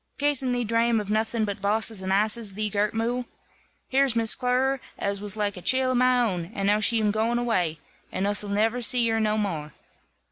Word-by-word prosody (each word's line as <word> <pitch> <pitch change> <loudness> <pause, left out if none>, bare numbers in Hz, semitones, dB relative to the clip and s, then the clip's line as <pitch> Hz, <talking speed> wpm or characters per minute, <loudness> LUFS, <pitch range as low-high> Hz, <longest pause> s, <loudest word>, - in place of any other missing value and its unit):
"Cas'n 280 -3 +2
thee 245 0 0
drame 230 0 +1
of 210 -1 -5
nothing 220 +1 0
but 200 -2 -5
bosses 215 0 +1
and 190 0 -3
asses, 210 +1 +1
thee 215 0 -2
girt 210 +1 -1
mule? 240 +2 -1 0.6
Here's 270 -2 +2
Miss 225 -1 +4
Clerer, 260 +1 0 0.2
as 200 0 -3
was 205 0 -5
like 205 -2 -1
a - - -8
cheel 260 +5 +1
of 255 - +1
my 250 0 +3
own, 185 -8 -1
and 195 - -2
now 205 +1 +3
she'm 215 -1 +2
gooin 225 +3 0
awai, 185 -10 -1 0.3
and 190 - -2
us'll 205 0 +1
niver 220 +4 0
zee 240 +1 +2
her 225 0 0
no 215 -1 +1
more." 160 -9 -3
220 Hz, 205 wpm, -25 LUFS, 205-240 Hz, 0.6 s, Miss